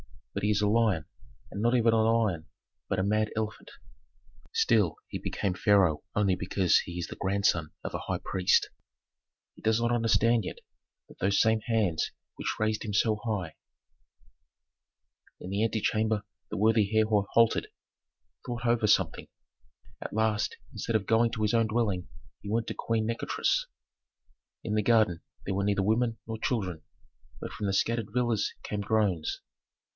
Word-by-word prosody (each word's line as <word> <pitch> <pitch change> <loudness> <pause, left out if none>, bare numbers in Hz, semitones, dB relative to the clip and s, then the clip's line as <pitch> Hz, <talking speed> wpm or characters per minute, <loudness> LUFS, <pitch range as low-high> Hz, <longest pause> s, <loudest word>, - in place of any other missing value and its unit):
But - - -3
he 105 - +2
is 105 -1 +2
a 105 - +2
lion, 105 -7 +2 0.5
and 100 - -4
not 120 +2 +3
even 115 -2 +4
a 110 - +4
lion, 110 -7 +1 0.4
but 95 - -1
a 95 - +1
mad 105 +2 +1
elephant. 110 0 -4 0.8
Still 450 0 +2
he - - -4
became 100 -3 -2
pharaoh 95 -5 +3
only 100 -3 +2
because 90 0 +2
he 90 0 -6
is 90 - -2
the - - -9
grandson 95 -5 +1
of - - -5
a - - -2
high - - -2
priest. 90 -1 +2 0.8
He - - -18
does 110 +1 +2
not 120 0 +1
understand 115 0 +3
yet - - -5 0.5
that - - -17
those 100 +2 +2
same 110 0 +4
hands 105 -9 +1 0.2
which - - -3
raised 110 0 0
him 105 - -4
so 110 +1 +2
high 100 -8 -3 0.9
" - - -38
In 90 - -7
the 100 +2 0
antechamber 110 -1 0 0.3
the - - -4
worthy 110 0 +3
Herhor 110 -2 +2
halted, 115 -1 +3 0.8
thought 120 0 -4
over 120 -2 +2
something; - - +2 0.7
at - - -6
last 110 0 0 0.2
instead 115 - -3
of 105 -3 +1
going 115 +1 +3
to 110 - -3
his 105 +2 +1
own 115 -1 +3
dwelling 110 -5 -1 0.3
he 100 - -7
went 115 +1 0
to - - -3
Queen 115 -1 -1
Nikotris. 115 - 0 1.0
In 105 - -3
the 105 - +3
garden 110 -6 +3 0.2
there 95 - -2
were 100 +1 0
neither 100 -1 +1
women 115 +3 +1
nor 110 0 -5
children, 95 -10 -2 0.6
but - - -5
from 105 - -4
the 100 - 0
scattered 115 +1 0
villas 120 -4 0
came 105 -1 -3
groans. 100 -6 0
110 Hz, 165 wpm, -29 LUFS, 100-115 Hz, 1.0 s, even